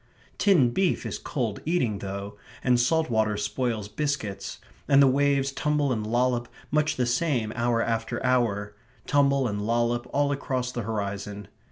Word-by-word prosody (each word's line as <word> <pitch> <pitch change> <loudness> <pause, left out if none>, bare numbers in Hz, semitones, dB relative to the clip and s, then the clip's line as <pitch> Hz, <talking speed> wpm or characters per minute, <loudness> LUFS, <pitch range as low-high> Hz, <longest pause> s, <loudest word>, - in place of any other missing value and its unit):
Tinned 155 - +4
beef 190 +3 +1
is - - -4
cold 120 -10 -3
eating, 130 - 0
though; 100 +1 -6 0.3
and 125 -2 +3
salt 155 +3 +2
water 110 -2 +1
spoils 110 0 -2
biscuits; 110 -3 -3 0.3
and 140 - +5
the 140 - +8
waves 140 0 +2
tumble 150 0 0
and 110 -2 -3
lollop 120 +1 +1 0.2
much 150 +1 +2
the 125 - +1
same 120 -3 0
hour 120 -1 +1
after 115 +1 -2
hour 105 -5 +1 0.3
tumble 140 -2 +3
and 105 -2 -3
lollop 120 +2 0
all 145 0 +1
across 130 -3 -2
the 120 - -3
horizon. 100 -2 -4
120 Hz, 155 wpm, -26 LUFS, 110-140 Hz, 0.3 s, the